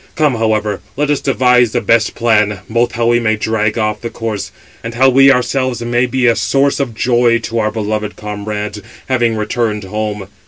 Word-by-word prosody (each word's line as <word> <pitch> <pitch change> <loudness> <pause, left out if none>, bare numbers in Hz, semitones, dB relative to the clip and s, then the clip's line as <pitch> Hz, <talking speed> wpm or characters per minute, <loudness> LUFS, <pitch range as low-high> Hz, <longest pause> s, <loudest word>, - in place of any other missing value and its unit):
Come, 150 -4 +2
however, 110 -3 -1 0.2
let 150 0 +1
us 145 - 0
devise 125 -4 +3
the 120 - +1
best 115 0 +1
plan, 105 -4 +1
both 120 +3 0
how 115 0 -1
we 120 0 +3
may 110 -2 +1
drag 110 0 -1
off 105 -1 -1
the 115 - -4
corse, 110 -4 -5 0.3
and 115 0 -6
how 130 +2 +4
we 135 +1 +6
ourselves 125 -1 0
may 120 +1 +1
be 130 +1 0
a 115 -1 +4
source 140 +4 +1
of 130 -5 -2
joy 120 0 +2
to 115 0 -2
our 110 -1 +1
beloved 105 -1 -3
comrades, 105 0 -5 0.3
having 120 -3 +1
returned 105 0 -2
home. 105 0 -4
115 Hz, 190 wpm, -15 LUFS, 105-125 Hz, 0.3 s, we